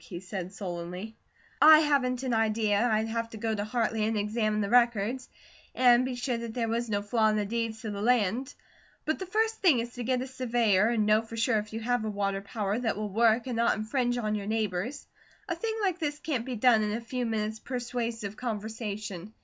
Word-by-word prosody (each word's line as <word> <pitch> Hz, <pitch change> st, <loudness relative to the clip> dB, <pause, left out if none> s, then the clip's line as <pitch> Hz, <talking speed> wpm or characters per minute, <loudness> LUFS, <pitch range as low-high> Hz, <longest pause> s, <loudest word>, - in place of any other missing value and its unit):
he 175 Hz, -, -7 dB
said 185 Hz, -1 st, -6 dB
sullenly. 180 Hz, +2 st, -6 dB, 0.5 s
"I 310 Hz, 0 st, +9 dB
haven't 265 Hz, -4 st, +1 dB
an 255 Hz, -2 st, -1 dB
idea. 220 Hz, 0 st, +2 dB
I'd 220 Hz, +1 st, +1 dB
have 230 Hz, 0 st, -2 dB
to 225 Hz, -, -9 dB
go 220 Hz, +1 st, -1 dB
the 205 Hz, -1 st, -2 dB
Hartley 225 Hz, -1 st, 0 dB
and 220 Hz, 0 st, 0 dB
examine 215 Hz, 0 st, 0 dB
the 200 Hz, -, -1 dB
records 240 Hz, 0 st, +2 dB, 0.5 s
and 245 Hz, -1 st, +5 dB
be 255 Hz, -1 st, -3 dB
sure 245 Hz, 0 st, -2 dB
that 230 Hz, -1 st, -6 dB
there 235 Hz, -2 st, 0 dB
was 230 Hz, +1 st, -1 dB
no 205 Hz, -1 st, -1 dB
flaw 220 Hz, +1 st, +2 dB
in 215 Hz, -, +1 dB
the 210 Hz, -1 st, 0 dB
deeds 225 Hz, +1 st, -3 dB
to 220 Hz, -, -4 dB
the 200 Hz, 0 st, -5 dB
land; 240 Hz, +3 st, +1 dB, 0.5 s
but 315 Hz, -, -1 dB
the 380 Hz, -, -5 dB
first 445 Hz, +3 st, 0 dB
thing 340 Hz, -9 st, +5 dB
is 235 Hz, +1 st, -3 dB
to 245 Hz, -, -5 dB
get 255 Hz, +1 st, +1 dB
a -, -, -5 dB
surveyor 235 Hz, -6 st, +2 dB
and 225 Hz, -2 st, +1 dB
know 215 Hz, +1 st, +4 dB
for 230 Hz, 0 st, -9 dB
sure 230 Hz, -1 st, +2 dB
if 210 Hz, 0 st, -7 dB
you 225 Hz, +1 st, -5 dB
have 245 Hz, 0 st, 0 dB
a 215 Hz, -, -2 dB
water 200 Hz, -1 st, -1 dB
power 205 Hz, +1 st, -2 dB
that 225 Hz, -4 st, -1 dB
will 210 Hz, 0 st, -3 dB
work 225 Hz, +2 st, +3 dB
and 250 Hz, -3 st, -3 dB
not 235 Hz, 0 st, +2 dB
infringe 245 Hz, +3 st, 0 dB
on 215 Hz, -3 st, -1 dB
your 205 Hz, -1 st, -3 dB
neighbours. 220 Hz, +4 st, -2 dB, 0.4 s
A 345 Hz, -, -1 dB
thing 440 Hz, +6 st, -3 dB
like 370 Hz, -3 st, 0 dB
this 295 Hz, -3 st, -2 dB
can't 265 Hz, -6 st, -3 dB
be 255 Hz, -, -3 dB
done 230 Hz, -1 st, +4 dB
in 210 Hz, 0 st, -1 dB
a 225 Hz, -, -2 dB
few 250 Hz, +2 st, -3 dB
minutes' 220 Hz, -1 st, -2 dB
persuasive 235 Hz, -4 st, -4 dB
conversation. 215 Hz, -4 st, -5 dB
225 Hz, 220 wpm, -28 LUFS, 210-245 Hz, 0.5 s, I